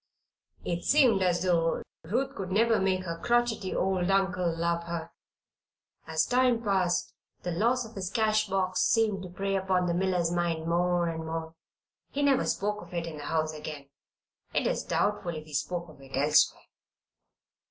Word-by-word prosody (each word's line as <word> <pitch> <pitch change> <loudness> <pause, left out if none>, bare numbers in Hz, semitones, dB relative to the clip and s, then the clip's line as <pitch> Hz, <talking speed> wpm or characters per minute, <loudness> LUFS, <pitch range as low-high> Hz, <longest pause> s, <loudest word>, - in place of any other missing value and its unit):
It 170 0 -2
seemed 250 -9 +4
as 175 -1 +2
though 165 -3 +1 0.2
Ruth 245 +11 -1
could 190 -1 -5
never 225 +3 +3
make 190 -1 +1
her 165 -2 -5
crotchety 240 -4 +1
old 185 -1 +1
uncle 190 -3 +2
love 170 0 0
her. 170 -1 -5 1.0
As 160 0 +1
time 245 -2 +2
passed, 185 -4 +1 0.3
the 180 - -2
loss 235 +8 +1
of 225 - -12
his 185 -3 -4
cash 215 +1 +2
box 190 -1 0
seemed 220 -4 +2
to 185 - -7
prey 195 +2 -2
upon 190 -1 +1
the 175 - 0
miller's 180 -2 +1
mind 170 -2 -1
more 175 +1 +1
and 160 -1 -3
more. 160 0 -4 0.6
He 285 - -2
never 280 -2 +3
spoke 210 +1 -1
of 175 0 -10
it 170 -1 -1
in 160 -2 -7
the 145 - -7
house 155 -1 0
again; 150 -2 -8 0.7
it - - +2
is - - 0
doubtful 200 -4 -1
if 155 0 -7
he 155 - -13
spoke 170 +5 -2
of 155 -3 -15
it 135 -1 -8
elsewhere. 150 +2 +3
180 Hz, 175 wpm, -29 LUFS, 165-200 Hz, 1.0 s, seemed